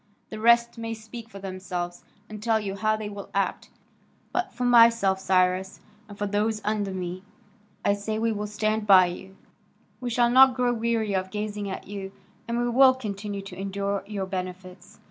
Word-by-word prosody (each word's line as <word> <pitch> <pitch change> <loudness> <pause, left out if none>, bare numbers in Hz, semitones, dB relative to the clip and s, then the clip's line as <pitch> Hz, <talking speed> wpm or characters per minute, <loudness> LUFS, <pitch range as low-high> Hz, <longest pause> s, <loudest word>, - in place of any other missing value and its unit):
The 215 - -6
rest 235 +1 +4
may 225 0 -4
speak 225 +1 -10
for 200 - -11
themselves, 185 -2 -5 0.2
and 215 -1 -9
tell 225 0 +2
you 200 -2 -4
how 215 +2 +1
they 215 -1 -5
will 200 -1 -8
act, 200 - -1 0.6
but 365 +1 -1
for 250 - -5
myself, 230 -5 +5
Cyrus, 185 0 +1 0.3
and 205 - -10
for 205 - -2
those 210 +2 0
under 210 -1 -1
me, 185 -1 -5 0.6
I 200 - +4
say 205 +2 -3
we 225 +1 +1
will 210 -1 -3
stand 215 +1 -1
by 190 -2 +8
you; 190 +2 -7 0.6
we 250 - -3
shall 240 0 +2
not 260 0 +7
grow 250 -1 +1
weary 225 -2 0
of 190 0 -1
gazing 210 0 -4
at 190 - -6
you, 195 -1 -7 0.4
and 235 0 -1
we 240 0 0
will 260 +2 +6
continue 205 -4 -5
to 195 - -9
endure 200 +1 -3
your 200 -2 -3
benefits." 185 -1 -7
205 Hz, 185 wpm, -26 LUFS, 195-230 Hz, 0.6 s, by